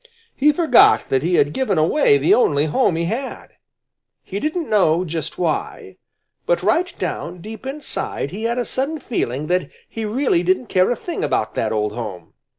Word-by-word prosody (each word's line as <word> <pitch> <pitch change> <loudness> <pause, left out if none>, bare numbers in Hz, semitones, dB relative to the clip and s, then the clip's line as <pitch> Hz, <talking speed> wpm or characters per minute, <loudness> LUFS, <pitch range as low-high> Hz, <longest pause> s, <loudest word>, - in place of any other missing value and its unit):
He 295 +2 +4
forgot 360 +7 +4
that 130 - +2
he 175 +4 +1
had 145 -1 +2
given 250 -9 0
away 155 - +4
the 140 +3 +3
only 145 -11 +3
home 170 - +1
he 165 +1 -1
had. 240 +9 -4 0.7
He 195 - -5
didn't 310 - -2
know 185 -4 +2
just 160 -2 -5
why, 165 -4 -3 0.5
but - - +1
right 355 +1 +2
down 180 - -4
deep 220 +7 -9
inside 270 - -4
he 215 +4 -5
had 235 +1 0
a 245 - -1
sudden 280 +5 -2
feeling 150 - -3
that 180 -3 0 0.2
he 225 - -6
really 220 -4 +1
didn't 185 +6 0
care 185 -1 +3
a 245 - +1
thing 345 - -5
about - - -1
that - - -1
old 105 -1 0
home. 105 -5 -7
190 Hz, 180 wpm, -20 LUFS, -, 0.7 s, He